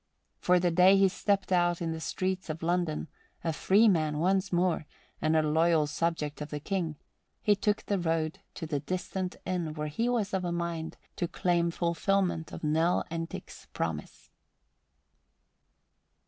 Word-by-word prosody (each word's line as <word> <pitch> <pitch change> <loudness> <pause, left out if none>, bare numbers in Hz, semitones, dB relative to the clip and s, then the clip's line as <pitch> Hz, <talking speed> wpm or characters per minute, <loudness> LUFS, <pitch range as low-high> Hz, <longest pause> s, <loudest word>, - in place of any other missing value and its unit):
For 180 0 +4
the 175 0 +2
day 185 +3 +6
he 195 0 +6
stepped 195 +1 0
out 175 -1 +3
in 165 -1 -2
the 160 - -4
streets 185 +3 -2
of 155 +1 -4
London, 170 -2 0 0.4
a 165 - 0
free 205 +8 +4
man 155 -6 +2
once 190 +4 +1
more 175 -3 +1 0.3
and 155 0 +2
a 155 - +4
loyal 160 +1 +3
subject 155 -1 -2
of 150 - -5
the 150 - -4
King, 170 -1 -2 0.5
he 210 - +4
took 210 +1 0
the 200 -2 0
road 160 -2 -1 0.2
to 165 - -5
the 150 -2 -1
distant 185 +3 -3
inn 175 -4 -2
where 150 -1 -3
he 230 +11 0
was 220 -5 0
of 190 -1 0
a 175 - -1
mind 170 -2 -3 0.2
to 175 - 0
claim 170 0 +1
fulfillment 170 0 0
of - - -8
Nell 160 +3 +2
Entick's 165 0 -6
promise. - - -4
170 Hz, 160 wpm, -29 LUFS, 160-185 Hz, 0.5 s, day